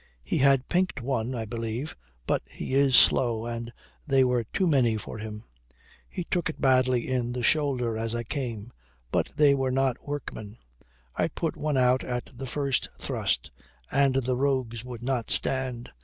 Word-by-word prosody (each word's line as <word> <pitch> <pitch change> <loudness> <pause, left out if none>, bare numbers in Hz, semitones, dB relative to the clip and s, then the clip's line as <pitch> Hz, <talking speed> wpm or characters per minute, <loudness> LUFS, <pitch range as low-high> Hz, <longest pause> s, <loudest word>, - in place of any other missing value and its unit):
He 65 - -1
had 135 -1 +4
pinked 180 -3 0
one, 125 -1 -2
I 115 -2 -3
believe, 115 +6 -4 0.3
but - - +1
he - - -6
is 135 -1 +4
slow, 115 -3 +5
and 115 0 -5 0.4
they 135 -1 +4
were 125 -2 +1
too 190 - -1
many 130 -9 +3
for 110 - -7
him. 105 0 -7 0.7
He - - -4
took 170 -1 -1
it 160 - -7
badly 130 -2 +3
in 125 -2 -1
the 125 -1 -3
shoulder 130 -5 +2
as 115 +1 -2
I 120 - -2
came. 120 -3 -5 0.4
But - - +1
they 145 -2 +5
were 135 -1 0
not 130 0 0
workmen. 115 -7 -6 0.6
I - - +1
put - - -3
one 150 -2 -1
out 125 0 +3
at 125 -1 -4
the 130 +2 -6
first 140 0 -1
thrust, - - -1 0.4
and 135 -1 +3
the 130 -1 +1
rogues 130 -4 -1
would 120 -2 -8
not 125 -3 -1
stand. 130 -2 0
125 Hz, 170 wpm, -27 LUFS, 115-135 Hz, 0.7 s, slow